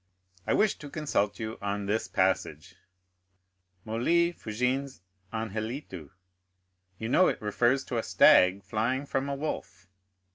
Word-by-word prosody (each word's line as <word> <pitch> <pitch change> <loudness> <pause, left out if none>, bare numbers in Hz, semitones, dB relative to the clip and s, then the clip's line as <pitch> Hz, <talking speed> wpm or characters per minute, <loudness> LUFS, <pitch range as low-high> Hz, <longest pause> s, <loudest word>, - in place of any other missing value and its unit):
"I - - +2
wish 210 -1 +2
to 145 - -9
consult 120 -10 -1
you 110 0 -5
on 100 0 -2
this 105 +3 -1
passage, 95 -2 -1 1.1
'Molli 165 +11 +2
fugiens 125 - -2 0.3
anhelitu,' 110 - -5 0.9
you 110 - -4
know 180 +10 +4
it - - -1
refers 120 +5 +1
to 120 - -2
a - - -3
stag 95 +2 +5
flying 125 +6 -1
from 135 0 -2
a 140 - -2
wolf. 140 -10 -5
115 Hz, 130 wpm, -28 LUFS, 100-135 Hz, 1.1 s, stag